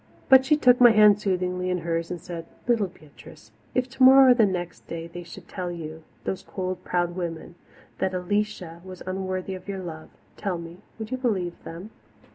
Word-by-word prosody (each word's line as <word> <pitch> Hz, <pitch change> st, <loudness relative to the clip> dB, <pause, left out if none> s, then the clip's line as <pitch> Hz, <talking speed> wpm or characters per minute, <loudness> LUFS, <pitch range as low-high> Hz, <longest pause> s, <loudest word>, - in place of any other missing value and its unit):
But 265 Hz, -1 st, +8 dB
she 300 Hz, +2 st, +4 dB
took 250 Hz, -4 st, +5 dB
my 240 Hz, -, +10 dB
hand 210 Hz, -2 st, +6 dB
soothingly 180 Hz, -2 st, -1 dB
in 180 Hz, -, +1 dB
hers 165 Hz, 0 st, -2 dB
and 175 Hz, -, -4 dB
said, 165 Hz, -1 st, -7 dB, 0.2 s
"Little 230 Hz, -5 st, +2 dB
Beatrice, 145 Hz, -, -16 dB, 0.2 s
if 255 Hz, 0 st, +1 dB
tomorrow 265 Hz, 0 st, +7 dB
or -, -, +9 dB
the 230 Hz, -4 st, +4 dB
next 175 Hz, -2 st, -5 dB
day 165 Hz, 0 st, -5 dB
they 170 Hz, +1 st, -8 dB
should 170 Hz, -1 st, -12 dB
tell 180 Hz, -2 st, -4 dB
you, 160 Hz, -2 st, -7 dB, 0.2 s
those 190 Hz, -, -3 dB
cold, 185 Hz, -1 st, -5 dB
proud 175 Hz, -1 st, -1 dB
women, 170 Hz, -2 st, -5 dB, 0.5 s
that 190 Hz, 0 st, 0 dB
Alicia 185 Hz, -2 st, -2 dB
was 185 Hz, -1 st, -10 dB
unworthy 185 Hz, 0 st, -3 dB
of 185 Hz, 0 st, -9 dB
your 190 Hz, -1 st, -4 dB
love, 160 Hz, -2 st, -8 dB, 0.3 s
tell 195 Hz, -4 st, -2 dB
me, 170 Hz, +1 st, -9 dB, 0.2 s
would 220 Hz, +1 st, -7 dB
you 255 Hz, -, -1 dB
believe 195 Hz, -9 st, -2 dB
them?" 175 Hz, +6 st, -9 dB
185 Hz, 190 wpm, -25 LUFS, 175-210 Hz, 0.5 s, my